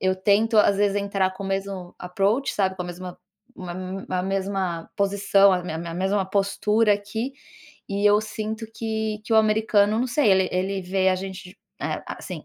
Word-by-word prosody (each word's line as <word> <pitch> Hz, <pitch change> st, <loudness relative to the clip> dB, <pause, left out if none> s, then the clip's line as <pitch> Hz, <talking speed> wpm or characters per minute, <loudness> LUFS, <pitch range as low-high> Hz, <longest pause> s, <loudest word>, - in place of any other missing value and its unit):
eu 185 Hz, 0 st, +2 dB
tento, 210 Hz, +4 st, +2 dB
às 205 Hz, -1 st, +5 dB
vezes, 200 Hz, 0 st, +2 dB
entrar 200 Hz, -2 st, 0 dB
com 200 Hz, -, -8 dB
o -, -, -4 dB
mesmo 195 Hz, -2 st, -4 dB
approach, 200 Hz, +9 st, 0 dB
sabe, 190 Hz, -2 st, 0 dB
com 180 Hz, -, -3 dB
a -, -, -7 dB
mesma 180 Hz, 0 st, -8 dB, 0.4 s
uma 180 Hz, -1 st, -6 dB
m 185 Hz, +1 st, -6 dB
a 185 Hz, -1 st, -1 dB
mesma 190 Hz, -3 st, -2 dB
posição, 200 Hz, 0 st, +4 dB
a 180 Hz, -, +1 dB
me 160 Hz, -3 st, -4 dB
me 165 Hz, 0 st, -6 dB
mesma 190 Hz, +2 st, 0 dB
postura 210 Hz, +2 st, +2 dB
aqui, 220 Hz, +6 st, -4 dB, 0.6 s
e 200 Hz, +1 st, +1 dB
eu 205 Hz, +1 st, +5 dB
sinto 215 Hz, +1 st, -5 dB
que 220 Hz, -1 st, -3 dB
que 230 Hz, -, -3 dB
o 220 Hz, -, +5 dB
americano, 215 Hz, -1 st, +3 dB
não 250 Hz, -, +1 dB
sei, 265 Hz, -4 st, +2 dB
ele 190 Hz, -1 st, +4 dB
ele 190 Hz, +2 st, -1 dB
vê 190 Hz, +1 st, +1 dB
a 185 Hz, -, +2 dB
gente, 190 Hz, 0 st, -8 dB, 0.2 s
eh, -, -, -2 dB
assim, -, -, -7 dB
195 Hz, 195 wpm, -24 LUFS, 185-210 Hz, 0.6 s, às